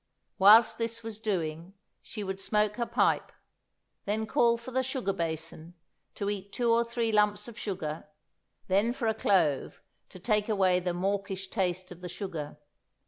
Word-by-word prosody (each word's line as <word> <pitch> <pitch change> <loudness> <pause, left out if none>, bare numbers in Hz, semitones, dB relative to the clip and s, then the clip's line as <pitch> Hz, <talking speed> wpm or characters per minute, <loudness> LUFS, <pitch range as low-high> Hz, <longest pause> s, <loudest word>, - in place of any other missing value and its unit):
Whilst 220 +4 +7
this 230 0 -2
was 220 -1 -7
doing, 175 -4 -3 0.3
she 215 - -7
would 190 0 -4
smoke 210 +1 +1
her 235 -1 -1
pipe, - - +1 0.7
then 215 +2 -1
call 235 +1 +3
for 235 +2 -9
the 260 +1 +1
sugar 260 -6 -2
basin 165 -1 -5 0.4
to 200 - -3
eat 200 -1 -4
two 240 +1 +1
or 235 +1 +4
three 235 -1 -1
lumps 210 0 +2
of 235 - -9
sugar, 160 -7 -4 0.6
then 200 +5 +2
for 240 -3 -2
a 220 - +2
clove 175 -10 +1 0.3
to - - -12
take 210 +3 0
away 190 -4 +3
the 180 -1 -2
mawkish 195 0 -2
taste 185 -2 -2
of 180 0 -11
the 180 - -6
sugar. 165 -7 -6
200 Hz, 165 wpm, -29 LUFS, 180-225 Hz, 0.7 s, Whilst